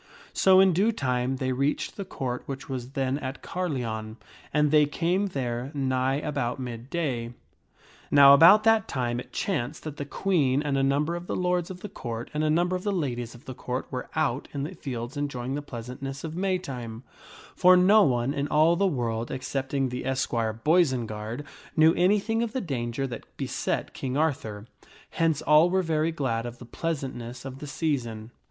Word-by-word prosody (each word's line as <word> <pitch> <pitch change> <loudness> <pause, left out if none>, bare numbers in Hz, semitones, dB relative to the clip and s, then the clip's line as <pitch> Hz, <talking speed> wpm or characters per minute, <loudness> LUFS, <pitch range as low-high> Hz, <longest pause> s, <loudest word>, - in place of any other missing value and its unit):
So 190 -1 +5
in 190 -1 +6
due 200 +7 +3
time 130 - -1
they 130 0 -2
reached 140 +3 -1
the 200 - -4
Court, 130 -8 -4
which 135 -1 -6
was 130 -1 -5
then 135 0 0
at 135 -1 -6
Carleon. 120 -11 -3 0.3
And 150 -1 +2
they 150 -1 +5
came 175 +7 0
there 125 -6 -3
nigh 130 -1 +1
about 140 -4 -2
mid 120 -1 -6
day. 130 -8 -2 0.8
Now 140 -1 +8
about 170 +9 +8
that 225 -2 +4
time 120 -2 -2
it - - -9
chanced 150 -6 -2
that 150 -2 -6
the 145 - -4
Queen 145 -5 +1
and 145 -2 0
a 135 - +2
number 145 +5 +1
of 175 +1 -7
the - - -2
lords 180 -1 0
of 185 -1 -8
the - - -5
Court, 120 - -6
and 150 +1 0
a 155 - +2
number 175 +4 +2
of 180 - -3
the 205 - -1
ladies 120 - -3
of 120 +5 -16
the 130 - -6
Court, 125 +1 -4
were 125 -1 -5
out 125 +4 0
in 140 - -2
the 160 +6 -5
fields 125 -5 -6
enjoying 135 -3 -3
the 145 - -2
pleasantness 135 +2 -7
of 160 -1 -5
the 175 - -4
Maytime; 130 -12 -3 0.5
for 180 0 +6
no 200 +4 +6
one 125 -3 +2
in 140 0 -1
all 155 +3 +4
the 200 +3 +2
world, 120 -7 -2
excepting 135 +1 -2
the 125 +1 -4
esquire, 120 -4 0
Boisenard, 120 -3 0 0.3
knew 160 +1 +6
anything 205 +5 +2
of 235 -1 -2
the 260 - 0
danger 135 - -3
that 125 - -8
beset - - -2
King 130 0 -3
Arthur; 110 -9 -1 0.5
hence 160 -3 +1
all 150 +3 +6
were 190 +1 +1
very 160 -1 +1
glad 120 -7 -2
of 120 0 -8
the 120 - -11
pleasantness 130 -5 -4
of 135 0 -7
the 150 - -7
season. 120 -8 -2
140 Hz, 190 wpm, -27 LUFS, 125-165 Hz, 0.8 s, Now